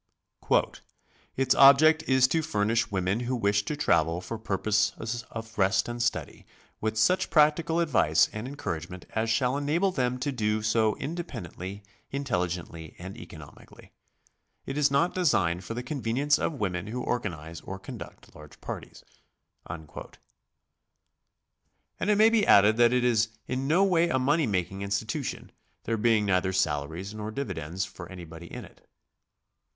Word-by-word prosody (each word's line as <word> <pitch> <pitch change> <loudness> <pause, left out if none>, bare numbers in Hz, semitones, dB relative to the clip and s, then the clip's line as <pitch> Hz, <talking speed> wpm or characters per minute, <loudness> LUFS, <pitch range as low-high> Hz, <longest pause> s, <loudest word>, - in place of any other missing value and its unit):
"Its 130 -1 +3
object 155 +3 +7
is 130 -1 +5
to 160 +5 +1
furnish 115 -6 0
women 95 +2 0
who 125 +1 -2
wish 100 -3 +1
to 150 - -2
travel 85 - +2
for 100 +5 -6
purposes 110 +3 -1
of 110 -1 -8
rest 95 0 +3
and 120 0 -4
study, 120 - -2 0.4
with 110 0 -2
such 185 +12 +2
practical 160 +2 +3
advice 100 - +3
and 110 +3 -5
encouragement 90 - -6
as 110 0 0
shall 125 +3 +1
enable 155 +7 +1
them 125 -6 -1
to 140 +3 -2
do 110 -3 -1
so 110 0 +2
independ 140 - -6
ently, 95 +3 -7 0.3
intelligently, 90 - -3
and 95 +2 -8
economically. - - -13 0.7
It 135 - -5
is 150 -1 +3
not 150 +6 +2
designed 95 - +1
for 115 - -6
the 125 - -4
convenience 135 +2 0
of - - -1
women 90 -1 -2
who 125 +3 -4
organize 85 -9 -4
or - - -7
condutt - - -10
large 75 -1 -14
parties." - - -8 0.6
And 80 -1 -7 2.2
it 210 - +4
may 220 +2 +6
be 225 -3 +2
added 105 +2 +6
that 120 0 +5
it 125 0 +2
i - - +3
s 115 -2 +3 0.2
in 130 +1 -3
no 170 +6 +4
way 170 -3 +3
a 130 - +1
money 145 +3 +2
^making 95 -1 -2
institution, 100 0 -3 0.3
there 115 - -1
being 110 -1 +2
neither 95 -1 +1
salaries 80 +3 -1
nor 105 0 -5
dividends 95 - -4
for 90 -1 -10
anybody 85 -2 -10
in - - -7
it. - - -20
110 Hz, 150 wpm, -27 LUFS, 95-140 Hz, 2.2 s, object